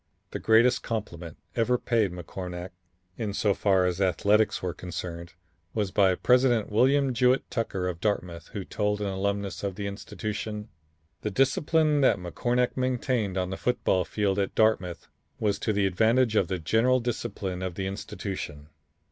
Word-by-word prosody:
The - - -4
greatest 115 +3 +4
compliment 90 -8 -5 0.2
ever 125 +2 +2
paid 115 -6 +1
McCornack, 90 +1 -6 0.5
in 105 -3 -2
so 105 -1 +2
far 95 -2 +2
as 90 +1 -1
athletics 100 +4 +2
were 90 -2 -1
concerned, 85 -1 -6 0.4
was 105 -3 0
by 95 -2 +4
President 125 -1 +3
William 135 +4 +3
Jewett 125 +2 +3
Tucker 95 -6 -2
of 85 -2 -4
Dartmouth, 90 -6 -2
who 100 -3 -6
told 105 -1 -1
an 105 - -2
alumnus 100 0 -2
of 100 -2 -2
the 100 - -4
institution: 105 +1 -5 0.5
"The 105 - -2
discipline 145 - +2
that 135 - +4
McCornack 120 +8 -1
maintained 125 -6 0
on 90 0 -1
the 95 - -3
football 110 -6 +1
field 100 +2 0
at 100 - -1
Dartmouth 95 -6 +1 0.3
was 105 -2 0
to 110 - 0
the 100 -1 +1
advantage 110 +5 +3
of 95 - +3
the 95 - -2
general 115 +10 +2
discipline 105 -6 -3
of 95 -2 -3
the 95 - -3
institution." 95 -6 -6
100 Hz, 155 wpm, -27 LUFS, 95-115 Hz, 0.5 s, greatest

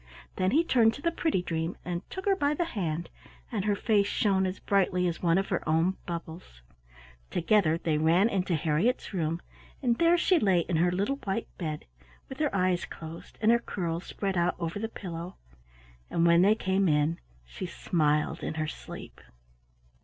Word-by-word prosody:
Then 185 0 +2
he 310 - +3
turned 230 -8 +3
to - - -10
the 335 - +2
pretty 320 - 0
dream 165 0 -2
and 175 -1 -3
took 375 - -6
her 395 -1 +4
by 290 -5 +1
the 345 - 0
hand, 170 - -3 0.4
and 210 -4 -2
her 205 -1 +2
face 205 -1 +2
shone 195 -2 +2
as 185 - -4
brightly 185 -2 +1
as 170 - -3
one 170 0 +3
of 195 - -1
her 185 - 0
own 165 +4 +2
bubbles. 165 - -7 0.7
Together 175 -2 +2
they 160 -3 0
ran 170 +6 +4
into 190 -5 0
Harriett's 165 +11 0
room, 165 -2 -1 0.4
and 240 -3 +1
there 340 +1 +5
she 350 0 +3
lay 190 - +3
in 170 0 -1
her 175 +2 +3
little 200 +10 0
white 210 -3 -4
bed, 155 -4 -4 0.4
with 265 - -8
her 300 -1 +2
eyes 185 -2 +1
closed 160 +1 -10
and 220 - +6
her 235 - +4
curls 170 -6 -3
spread 195 -2 -3
out 175 +1 +2
over 170 +3 -3
the 225 +1 -3
pillow, 175 -3 -7 0.7
and 170 - +1
when 170 0 +6
they 205 +3 +5
came 190 -3 +1
in 150 +2 +1 0.3
she - - -6
smiled 150 - 0
in - - -4
her 155 -1 -1
sleep. - - -9
180 Hz, 185 wpm, -28 LUFS, 165-215 Hz, 0.7 s, and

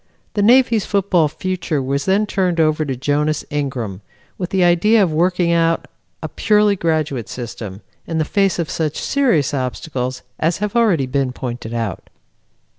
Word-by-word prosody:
The 205 - 0
Navy's 235 -1 +4
football 190 -5 +2
future 175 -1 -3
was 140 +1 -2
then 200 +3 +2
turned 185 -4 0
over 155 -1 +2
to 135 -2 -2
Jonas 145 +3 0
Ingram, 130 -9 -3 0.3
with 180 -1 -4
the 190 -2 +2
idea 195 +6 +4
of 170 -5 0
working 175 +1 +2
out 165 0 +1 0.4
a - - -2
purely 210 -1 +2
graduate 155 - -1
system, 110 -5 -7 0.3
in 165 - -2
the 155 - +1
face 195 +1 +1
of 170 -3 -1
such 155 -2 -2
serious 175 - +1
obstacles 130 -1 -3 0.2
as 165 +2 +1
have 210 +2 -3
already 205 - +3
been 135 0 -1
pointed 120 -2 -5
out. 115 -6 -4
160 Hz, 160 wpm, -19 LUFS, 135-190 Hz, 0.4 s, Navy's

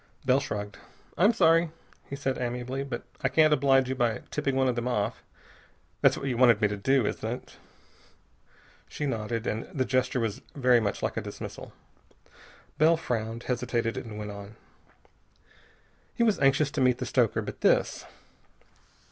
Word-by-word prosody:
Bell 130 +1 +4
shrugged. 105 -6 -5 0.4
"I'm 200 +7 +5
sorry," 165 -6 +4 0.4
he 140 - -4
said 135 -1 -2
amiably, 125 +2 -3
"that 135 -3 -5 0.2
I - - +1
can't 155 -1 +4
oblige 135 -2 +3
you 130 - -1
by 120 -4 -1
tipping 140 -3 -1
one 130 0 +2
of 125 - +2
them 120 +1 -2
off. 110 -2 -1 0.8
That's - - +4
what - - -5
you 125 -3 -1
wanted 120 -4 +5
me 105 - +3
to 105 - -2
do, 130 +4 +2
isn't - - -3
it?" 125 - -8 1.3
She 150 - -4
nodded, 115 -3 -2
and 110 - -2
the 140 -8 -2
gesture 130 +1 0
was 110 -3 -2
very 125 -3 +4
much 105 -3 -2
like - - -2
a - - 0
dismissal. - - -8 1.1
Bell 160 +2 +5
frowned, 115 -6 -3
hesitated, 120 -2 -1
and 110 -3 -6
went 105 -1 -5
on. 100 +1 -10 1.6
He 235 - +2
was 220 -3 +2
anxious 140 +1 +3
to 145 - -2
meet 125 -1 +3
the 125 - -4
stoker, 120 -3 +1
but - - -8
this.... - - +2
125 Hz, 165 wpm, -28 LUFS, 115-135 Hz, 1.6 s, I'm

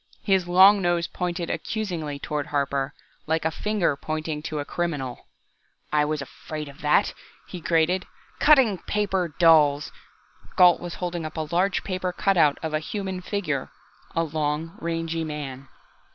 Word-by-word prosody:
His 190 -3 +2
long 190 +3 +7
nose 175 -1 +1
pointed 175 -1 -3
accusingly 170 -10 -3
toward 145 0 -3
Harper, 140 -1 -1 0.3
like 160 0 0
a 160 - +2
finger 205 -4 0
pointing 155 +1 -3
out 155 - -4
a 145 - -3
criminal. 145 -9 -3 0.7
"I 150 -1 +4
was 150 -1 -2
afraid 150 +2 -7
of 140 0 -13
that!" 150 +7 +3 0.3
he 180 - -8
grated. 165 +3 +1 0.3
"Cutting 255 - +5
paper 190 -6 -1
dolls!" 150 -4 +5 0.6
Gault 180 -1 +6
was 175 -1 -6
holding 175 -2 -3
up 155 0 -6
a 155 0 -4
large 190 +3 +1
paper 185 -1 -2
cutout 175 -6 +3
of 160 -1 -3
a 155 - +2
human 190 +2 -4
figure 180 -8 -2 0.5
a 165 - +2
long, 155 +1 -2
rangy 165 -1 -2
man. 140 -4 -6
165 Hz, 150 wpm, -25 LUFS, 150-180 Hz, 0.7 s, long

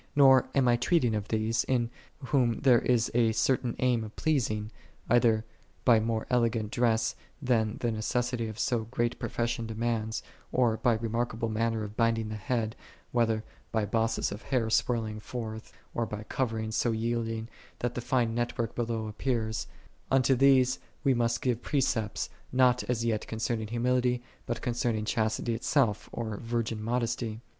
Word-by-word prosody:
Nor 135 -2 +6
am 135 -2 +4
I 120 0 +4
treating 125 -3 +2
of 105 -1 -2
these, 110 +1 +1
in 120 -2 0 0.4
whom 125 -5 +2
there 125 -4 +6
is 120 -2 +1
a 115 -1 +3
certain 120 +1 +1
aim 125 -3 +2
of 110 0 -9
pleasing, 110 -8 0 0.4
either 115 -2 +4 0.4
by 115 -3 +6
more 110 0 -1
ele 120 -2 +4
gant 110 -2 -3
dress 115 -2 +2 0.3
than 115 -5 +1
the 120 - +1
necessity 120 +2 -1
of 110 -1 -7
so 115 -1 0
great 120 +1 -1
pro - - -3
fession 120 -1 -1
demands, 110 0 -2 0.3
or 120 -3 +2
by 120 -1 +3
remarkable 115 0 -1
manner 110 0 0
of 105 0 -7
binding 115 -1 +1
the 110 - -4
head, 110 +1 -2 0.4
whether 115 -2 +1 0.3
by 110 -2 +1
bosses 115 0 0
of 105 +2 -6
hair 120 -5 0
swelling 110 -3 +1
forth, 110 -1 -6 0.2
or 115 -1 -1
by 105 0 -5
coverings 110 -2 -2
so 120 - +2
yield 115 +1 -1
ing, 110 0 -4 0.3
that 120 - -2
the 125 - -3
fine 120 -2 +1
net 120 +1 -2
work 115 -2 -1
below 115 -2 -2
appears: 110 0 -2 0.4
unto 135 0 +4
these 130 -1 +4 0.2
we 135 -3 +4
must 120 +1 0
give 125 -3 0
precepts, 115 - 0 0.2
not 125 -1 +4
as 115 -2 -1
yet 110 -2 -1
concerning 110 0 -2
humility, 125 +1 +1 0.2
but 120 -1 -3
concerning 120 -3 0
chastity 110 +1 0
itself, 115 -2 +1
or 110 -3 -4
virgin 115 -1 -2
modesty. 115 -1 -1
115 Hz, 165 wpm, -29 LUFS, 110-125 Hz, 0.4 s, Nor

